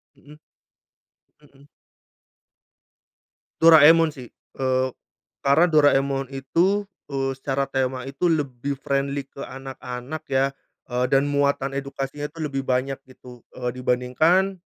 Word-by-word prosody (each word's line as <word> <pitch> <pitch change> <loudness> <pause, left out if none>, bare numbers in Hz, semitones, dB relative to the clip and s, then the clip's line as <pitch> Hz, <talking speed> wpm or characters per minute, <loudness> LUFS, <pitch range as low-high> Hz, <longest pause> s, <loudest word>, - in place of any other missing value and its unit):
Mhm. 150 +1 -17 1.0
Mhm. 140 -1 -22 2.0
Doraemon 165 0 +8
sih, 130 -6 -11 0.2
eee, 130 -1 +1 0.6
karena 140 +5 +5
Doraemon 140 -3 +2
itu, 180 +10 0 0.2
eee, 135 -1 -1
secara 135 +1 -2
tema 130 -1 -2
itu 165 +6 0
lebih 140 -2 -2
friendly 140 0 -2
ke 140 - -9
anak-anak 130 +2 -7
ya, 135 0 +3 0.4
eee, 125 0 0
dan 135 +1 +3
muatan 140 -1 0
edukasinya 140 +1 -5
itu 165 - -14
lebih 135 -3 -2
banyak 130 +1 0
gitu, 125 -2 -15
eee, 125 -1 -4
dibandingkan, 155 +10 +1
135 Hz, 110 wpm, -23 LUFS, 130-150 Hz, 2.0 s, Doraemon